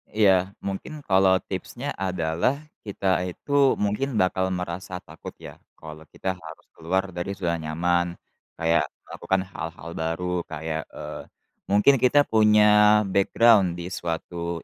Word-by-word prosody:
Iya. 95 -2 +3
Mungkin 145 +10 -6
kalau 95 -2 +4
tipsnya 120 +8 -5
adalah, 90 +4 0 0.3
kita 100 -1 -4 0.2
itu 140 +9 +2
mungkin 105 +6 -1
bakal 95 -1 +1
merasa 90 +1 -5
takut - - -11
ya - - -12 0.2
kalau 80 0 -11
kita 95 - -3
harus 80 -1 -12
keluar 95 +4 -1
dari 90 +3 -4
zona 85 -3 -2
nyaman, 85 +2 0 0.4
kayak 80 0 +1 0.2
melakukan 95 0 -2
hal-hal 85 -1 -7
baru 80 +2 -2 0.2
kayak, 80 0 -4
eee, - - -7 0.5
mungkin 105 +7 +4
kita 130 +4 +5
punya 105 -1 +5
background 100 -1 +4
di 90 +1 -7
suatu 85 0 -4
95 Hz, 125 wpm, -25 LUFS, 85-105 Hz, 0.5 s, kita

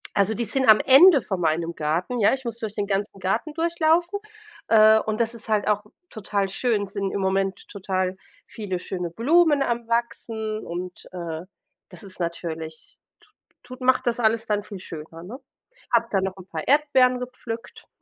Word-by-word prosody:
also 200 +2 +2
die 235 +1 -2
sind 265 0 0
am 215 - +8
Ende 285 +1 +7
von 190 -3 -3
meinem 165 +1 0
Garten, 170 +11 -1
ja, 205 - +4
ich 265 -2 -12
muss 230 0 -4
durch 215 -2 -5
den 205 - -1
ganzen 200 0 -2
Garten 220 +11 -1
durchlaufen, 340 +3 +1 0.5
äh, 220 0 +7
und 215 +1 -3
das 230 +1 0
ist 225 -1 -9
halt 210 -1 +1
auch 210 0 +1 0.3
total 200 -2 -2
schön. 210 -2 0
Sind 195 -1 -3
im 200 - -2
Moment 190 0 -1
total 185 -1 -2 0.3
viele 190 -5 -4
schöne 180 -2 -4
Blumen 295 - +3
am 235 -2 -2
Wachsen 225 -2 -2
und, 180 +1 -6
äh, 170 -3 -5 0.5
das - - -11
ist 190 -2 -8
natürlich 165 -2 -5 0.2
tu 425 - -26 0.5
tut 255 - -22
macht 255 0 +3
das 240 0 0
alles 225 -1 +2
dann 205 -1 0
viel 200 -2 -9
schöner, 165 0 -9
ne? 240 +9 -9 0.5
Habe 230 0 +3
da 195 - +2
noch 190 -1 -3
'n 185 - -11
paar 160 -4 -6
Erdbeeren 265 -3 +4
gepflückt. 245 -2 -8
215 Hz, 180 wpm, -24 LUFS, 185-245 Hz, 0.5 s, am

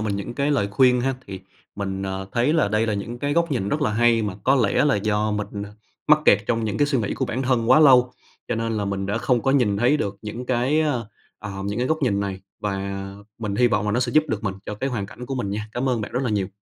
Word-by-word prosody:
mình 105 -2 -1
những 100 +4 -5
cái 140 +1 0
lời 115 -9 +1
khuyên 125 +3 +4
ha. 135 +2 0
Thì 95 -1 -7 0.3
mình, 95 -1 -4
à, 95 0 -3
thấy 125 +5 +2
là 160 -10 +2
đây 105 +2 +1
là 105 - 0
những 115 +4 -5
cái 145 +3 -1
góc 170 +1 +1
nhìn 100 -7 -1
rất 150 +6 -1
là 115 - +1
hay 115 0 +3
mà 100 -3 -3
có 135 - +4
lẽ 115 +2 +2
là 140 -7 +3
do 105 +1 0
mình, 105 -1 -4
à, 100 - -12 0.4
mắc 150 0 +6
kẹt 100 - +6
trong 115 -1 0
những 105 -1 -2
cái 145 - +3
suy 140 -3 +1
nghĩ 105 - -2
của - - -1
bản 130 +4 -3
thân 125 -3 +1
quá 155 - +7
lâu, 125 -4 +6 0.4
cho - - 0
nên 115 0 -2
là 105 - -1
mình 100 -1 -2
đã 105 +3 -1
không 120 0 +1
có 135 - +2
nhìn 120 -7 +2
thấy 120 +8 +3
được 100 -6 -3
những 115 +4 -6
cái, 130 +5 +1
à, 150 -3 +1 0.4
à, 105 - -7
những 100 +2 -3
cái 125 - 0
góc 160 0 +1
nhìn 100 -6 +1
này. 95 -1 -4 0.2
Và 100 -1 -3 0.4
mình 105 -3 -3
hy 125 - +4
vọng 105 -3 +1
là 105 - 0
nó 120 - +1
sẽ 120 -1 -1
giúp 155 0 +4
được 110 -2 -3
mình 95 - -1
cho 105 - -4
cái 135 +6 -3
hoàn 105 -6 -3
cảnh 125 +3 -10
của 135 - -3
mình 110 -6 -3
nha. 105 +1 -4
Cảm 125 +2 -1
ơn 125 -3 0
bạn 105 - -6
rất 125 +2 -1
là 125 - -1
nhiều! 100 -3 0
115 Hz, 290 wpm, -23 LUFS, 100-130 Hz, 0.4 s, quá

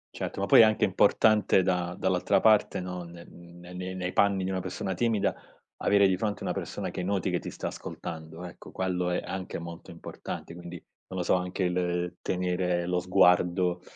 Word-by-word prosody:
Certo, - - -4
ma 100 - 0
poi 100 - +8
è - - +10
anche 110 -1 +3
importante 105 +1 +4
da 90 -1 0
dall'altra - - +2
parte 110 -2 +4
no, 90 -1 -5
ne 85 0 -11
n 85 0 -15 0.2
nei 90 +1 -5
nei 90 0 -3
panni 100 -2 +2
di - - -2
una 95 -1 -1
persona 95 +1 -4
timida, 110 +1 +1 0.5
avere 100 -1 +5
di 95 - +2
fronte 105 +1 -3
una - - -1
persona 100 -2 -4
che 90 +1 -4
noti 95 -1 0
che - - 0
ti - - -7
sta - - -5
ascoltando 80 +1 -7
ecco, 90 - -11
quello 90 -1 -1
è 90 - 0
anche 95 -2 -5
molto 85 0 -9
importante 85 - -8
quindi, 85 -1 -9 0.3
non 95 - -5
lo - - 0
so, - - +3
anche 90 +1 -2
il 90 0 -1
tenere 90 -1 -1
lo 90 0 +1
sguardo, 90 -1 +3
90 Hz, 195 wpm, -28 LUFS, 90-95 Hz, 0.5 s, è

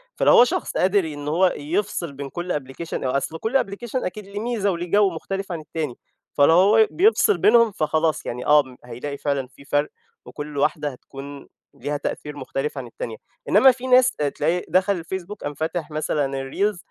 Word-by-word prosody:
فلو - - +4
هو 240 - +9
شخص 245 - -2
قادر 190 +2 +3
إن 145 -2 -6
هو 175 +4 +3
يفصِل 170 0 -2
بين 140 0 -7
كل 175 +3 -4
application 145 +4 -6
أصل 140 +5 -1
كل 230 +8 +1
application 210 +5 -8
أكيد 210 +3 -5
ليه 200 +1 -6
ميزة 215 -3 0
وليه 175 0 -4
جو 205 -1 +5
مختلف 195 +3 -5
عن 170 - -3
التاني، 155 -4 -4 0.4
فلو 145 +3 +6
هو 210 +5 +6
بيفصِل 425 +2 +4
بينهم 230 0 +5
فخلاص، 155 -2 0
يعني 125 +1 -5
آه، 145 -4 +3
هيلاقي 135 +4 -6
فعلًا 140 -3 -1
في 140 +2 -18
فرِق، 145 +1 +1 0.4
وكل 145 -1 -7
واحدة 150 +1 +1
هتكون 140 +1 -10 0.3
ليها 145 +3 -3
تأثير 150 0 -5
مختلف 135 +2 -4
عن 125 -3 -5
التانية. 115 -1 -7 0.3
إنما 260 +7 +7
في 255 +1 -7
ناس 255 0 +6
تلاقي 150 +4 -1
دخل 185 -1 +2
الFacebook، 190 +3 -5
قام 145 - -3
فتح 160 +2 -3
مثلًا 150 -1 0 0.3
الreels 205 +3 0
160 Hz, 175 wpm, -23 LUFS, 145-200 Hz, 0.4 s, هو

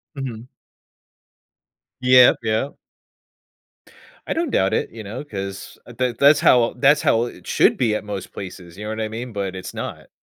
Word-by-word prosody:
Mhm. 125 -4 -6 1.5
Yep. 125 0 +6
Yep. 110 +6 -1 1.5
I - - -1
don't 330 -4 -2
doubt 95 - +2
it, - - -1
you 110 -1 -9
know, 110 +7 -6
'cause, 95 -7 -7
uh, 120 - -12
that 125 -2 -1
that's 145 +2 +6
how 120 -2 +4
that's 140 +4 +4
how 115 +1 +2
it 120 - -11
should - - +3
be 115 -4 +1
at - - -3
most 100 -3 -6
places. 90 -2 -9
You 105 - -7
know - - -4
what 110 0 -4
I 110 - -1
mean? 115 +2 -6
But 100 -2 -3
it's 95 - -7
not. - - -7
115 Hz, 175 wpm, -21 LUFS, 100-125 Hz, 1.5 s, Yep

